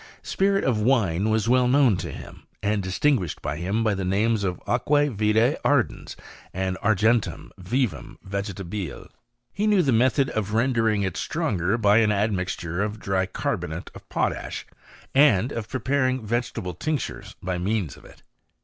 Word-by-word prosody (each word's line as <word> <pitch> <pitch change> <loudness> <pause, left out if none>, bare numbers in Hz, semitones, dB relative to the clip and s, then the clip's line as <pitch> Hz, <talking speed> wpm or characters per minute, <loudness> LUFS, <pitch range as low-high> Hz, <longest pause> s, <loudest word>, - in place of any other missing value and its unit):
Spirit 195 0 +1
of 115 -5 +1
wine 105 -5 +2
was 110 0 +1
well 125 +1 +4
known 130 -4 +4
to - - -5
him, - - -10 0.2
and 105 -1 0
distin 115 +9 +2
%'liished 90 -5 -5
by 70 +2 -4
him 95 +7 -1
by 110 -2 +2
the 95 -1 -3
names 105 +3 +1
of 90 -2 -2
aqua 145 +6 +2
vitee 110 +5 +2
ardens.and 95 -7 -2
^tgentum 110 +2 +1
vivum 120 +5 -2
yegetabile. 100 -4 -5 0.4
He 210 +2 0
knew 205 -4 +4
the 135 - +2
method 130 +4 +3
of 110 -2 -2
tendering 115 -2 +1
it 95 -3 -2
stronger 95 +3 -1
by 105 -1 +4
an 110 -2 +3
admixture 95 -4 -1
of 105 +1 -2
dry 95 -2 0
carbonate - - -4
of - - -14
potash, - - -2 0.5
and 130 -4 +4
of 110 -2 -5
preparing 130 -1 0
vegetable 115 -5 -2
tinctures 100 - -4
by 90 -1 -3
tneans 95 - -1
of - - -17
it. - - -17
110 Hz, 155 wpm, -24 LUFS, 95-125 Hz, 0.5 s, well